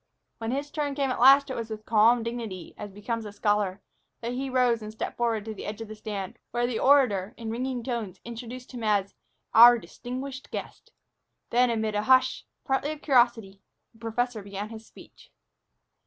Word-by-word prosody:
When 225 0 -3
his 280 +3 -3
turn 290 -2 -2
came 275 -2 0
at - - -3
last, 275 +2 +7
it - - -3
was 230 -1 -4
with 215 -1 -7
calm 230 +2 +4
dignity, 225 -7 -5
as 205 -1 -8
becomes 220 +3 -4
a 210 - -7
scholar, 205 -2 0 0.4
that 235 +1 -3
he 265 +2 -3
rose 250 -3 +2
and 215 0 -7
stepped 220 - -5
forward 230 -3 0
to 220 - -5
the - - -8
edge 210 +1 -5
of 225 - -6
the 215 - -8
stand, 210 0 -6
where 240 +1 0
the 240 -2 -2
orator, 240 -8 +3
in 225 -1 -5
ringing 250 +1 -3
tones, 225 -7 -4
introduced 240 +2 -8
him 245 -3 -7
as 205 -2 +1 0.4
"our 240 +2 +9
distinguished 260 +3 -7
guest." - - -7 0.6
Then, 245 +1 +4
amid 220 -2 -1
a 210 - +1
hush, 255 +4 +3 0.2
partly 270 +2 0
of 305 - -13
curiosity, 235 -7 +2 0.3
the 225 - -22
professor 230 0 -2
began 200 +1 -6
his 225 -1 -10
speech. - - -17
230 Hz, 190 wpm, -27 LUFS, 215-250 Hz, 0.6 s, our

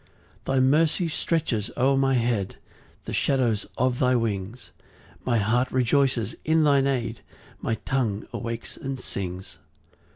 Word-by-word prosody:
4 135 - 0
Thy - - +4
mercy 155 +6 +3
stretches 150 -10 0
o'er 135 +2 +3
my 135 0 +3
head 115 -5 0 0.5
The - - -5
shadow 130 -5 +2 0.2
of 125 0 +1
thy 125 0 +3
wings; 110 0 -3 0.5
My 120 -2 +1
heart 120 +5 +1
rejoices 130 -3 +2
in 160 0 +3
thine 140 -2 +4
aid, 115 -5 -2 0.4
My 115 - 0
tongue 115 -6 -1
awakes 115 -1 -5
and 135 0 -4
sings. 90 -6 -6
125 Hz, 135 wpm, -25 LUFS, 115-135 Hz, 0.5 s, Thy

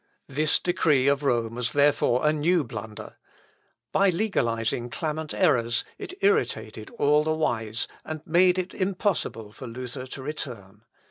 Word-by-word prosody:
This 150 +3 +2
decree 150 -6 +2
of 140 0 +3
Rome 120 -5 0
was 120 0 -2
therefore 145 -2 +3
a 150 - +4
new 160 +2 +2
blunder. 110 -3 -8 0.7
By 195 0 +4
legalising 120 - 0
clamant 155 +1 -3
errors, 120 -10 +2
it 370 - -7
irritated 420 +3 0
all 150 -2 +4
the 155 0 0
wise, 115 -7 -1 0.2
and 155 -1 -7
made 180 +2 +4
it 185 0 -3
impossible 185 - -1
for 130 +3 -9
Luther 125 +2 -6
to 135 +1 -8
return. 115 -8 -7
145 Hz, 140 wpm, -26 LUFS, 120-165 Hz, 0.7 s, a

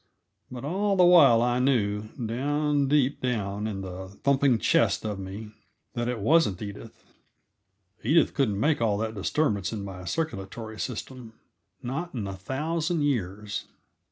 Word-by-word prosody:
But 125 +1 -7
all 195 +6 0
the 185 - +5
while 165 -10 +7
I 120 0 +1
knew, 110 -5 +1
down 140 +4 0
deep 145 -1 +2
down 105 -4 -2
in 100 -3 -4
the 95 0 -7 0.2
thumping 140 -3 +3
chest 110 - +2
of 105 -2 -3
me, 100 +3 -7 0.4
that 120 0 -2
it 125 -1 -1
wasn't 115 - +3
Edith. 100 -1 -9 1.0
Edith 155 +7 +3
couldn't 110 -8 +1
make 150 +1 +2
all 105 -3 +2
that 110 +1 -2
disturbance 105 - 0
in 105 -3 -4
my 90 -2 -8
circulatory 110 - -4
system, 125 -1 -6 0.5
not 155 +6 -4
in 110 -4 -3
a 95 - -4
thousand 155 - -2
years. 105 -6 -2
120 Hz, 145 wpm, -27 LUFS, 105-145 Hz, 1.0 s, while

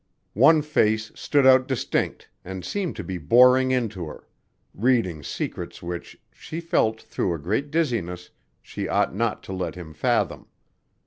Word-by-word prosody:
One 150 +7 +5
face 110 -7 +1
stood 145 -2 +1
out 130 -1 +6
distinct 130 -4 -2 0.2
and 95 -1 -7
seemed 195 - -3
to - - -5
be 95 -2 -5
boring 125 - +5
into 110 -9 -1
her, 75 - -11 0.5
reading 110 -9 +1
secrets 75 - -5
which, 85 0 -6
she 160 - -7
felt 110 -10 +1
through 90 -5 -2
a - - -5
great 105 - -2
dizziness, 115 - -2 0.3
she - - -5
ought - - +1
not 115 +2 -1
to 95 - -7
let 90 -1 -3
him 85 -3 -9
fathom. 75 - 0
110 Hz, 150 wpm, -24 LUFS, 90-130 Hz, 0.5 s, out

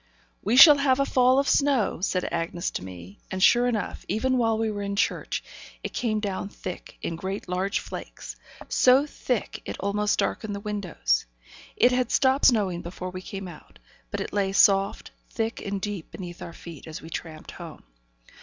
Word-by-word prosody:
'We 220 +4 +1
shall 290 +2 +11
have 270 -1 +3
a 275 - +3
fall 255 -1 +4
of 275 0 +2
snow,' 275 -10 +2
said 185 -1 0
Bessy 170 +1 -2
to - - -4
me. 95 +1 -10
And 190 0 -2
sure 245 0 +5
enough, 225 -4 -2
even 260 +3 +1
while 225 -2 +2
we 220 -1 0
were 205 -1 -4
in 200 0 -3
church, 215 - -1 0.4
it - - -5
came 220 -3 0
down 200 -1 -3
thick, 185 -3 -8
in 165 - -2
great 190 +4 -5
large 185 +2 -1
flakes, - - -7 0.3
so 260 +3 +5
thick, 250 -5 -3
it - - -6
almost 205 +1 0
darkened 210 -2 -1
the - - -4
windows. 185 - -1 0.5
It 245 - +5
had 250 -1 +1
stopped 265 +1 +3
snowing 200 -8 +2
before 180 +1 -6
we 185 0 -7
came 195 0 -7
out, 170 -4 -13 0.3
but - - -4
it - - -5
lay 195 -1 0
soft, 195 0 +3 0.2
thick 225 0 -3
and 200 -1 -3
deep 200 -4 -5
beneath 175 -2 -9
our 170 - -7
feet, 165 -5 -11
as 155 -1 -8
we 165 - -10
tramped 155 -1 -7
home. 170 -3 -10
200 Hz, 185 wpm, -26 LUFS, 180-240 Hz, 0.5 s, shall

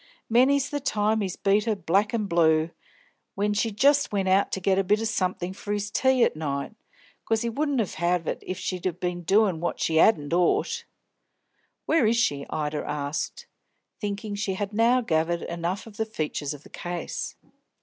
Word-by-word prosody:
Many's 265 +4 +4
the 290 - -1
time 220 -4 +1
he's 190 -3 -2
beat 200 +1 +2
her 220 -2 +1
black 195 +3 +1
an' 225 -3 -1
blue, 165 -3 +3 0.6
when 205 +1 0
she 210 +2 +1
jist 280 +7 +3
went 195 -2 0
out 190 +2 +3
to - - -2
get 190 +1 +2
a - - +2
bit 210 +3 +2
o' - - -2
somethink 185 -4 -1
for 205 - -6
his 205 0 -3
tea 260 -2 +3
at - - +2
night, 140 +2 -3 0.5
'cos 225 0 0
he 235 - 0
would 290 +6 -1
'ave 175 -4 0
it 185 - -6
she'd 185 -1 -3
been 180 -1 -2
a - - -8
doin' 190 0 +3
what 175 - -2
she 160 -1 +2
'adn't 160 -6 +4
ought 175 0 +1 0.5
" - - -46
"Where 300 -9 +3
is 230 +1 +2
she?" 145 -11 0
Ida 150 -1 -2
asked, 145 0 -3 0.5
thinking 205 0 -4
she 205 -2 -2
had 205 +1 -4
now 235 +4 +4
gathered 170 -4 0
enough 170 +3 -3
of 215 -3 -13
the 220 - 0
features 150 -7 -3
of 145 - -14
the - - -15
case. 175 -1 -5
195 Hz, 190 wpm, -26 LUFS, 170-220 Hz, 0.6 s, Many's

